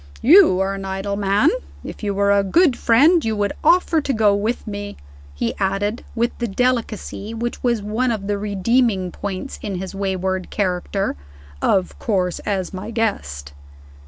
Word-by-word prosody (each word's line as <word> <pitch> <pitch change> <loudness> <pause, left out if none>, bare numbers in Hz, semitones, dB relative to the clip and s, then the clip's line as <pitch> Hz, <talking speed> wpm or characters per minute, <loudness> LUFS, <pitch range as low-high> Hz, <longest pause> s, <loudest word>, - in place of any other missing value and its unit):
You 315 - +7
are 195 +1 0
an 195 0 -6
idle 195 +1 -3
man. 200 - +3 0.3
If - - -8
you 205 -2 -1
were 200 0 +2
a 200 0 +4
good 285 - +3
friend, 300 +11 +4
you 220 -1 -1
would 205 -1 -1
offer 335 0 +4
to 275 - -1
go 215 -3 +3
with 215 +4 -1
me." 205 -1 -6 0.4
He 95 - -1
added, 200 +3 -1
with 235 +1 0
the 240 - -1
delicacy 225 -1 -2
which 235 +1 -4
was 235 -4 0
one 225 +5 0
of 215 -4 -2
the 205 0 -1
redeeming 205 -1 +1
points 200 +8 -6
in 205 -4 -4
his 185 +1 -5
wayward 190 -1 -2
character. 190 - -1 0.4
"Of 190 -2 +1
course 185 -5 -1
as 195 -3 -3
my 190 +3 -6
guest." 75 - -3
205 Hz, 165 wpm, -21 LUFS, 195-235 Hz, 0.4 s, You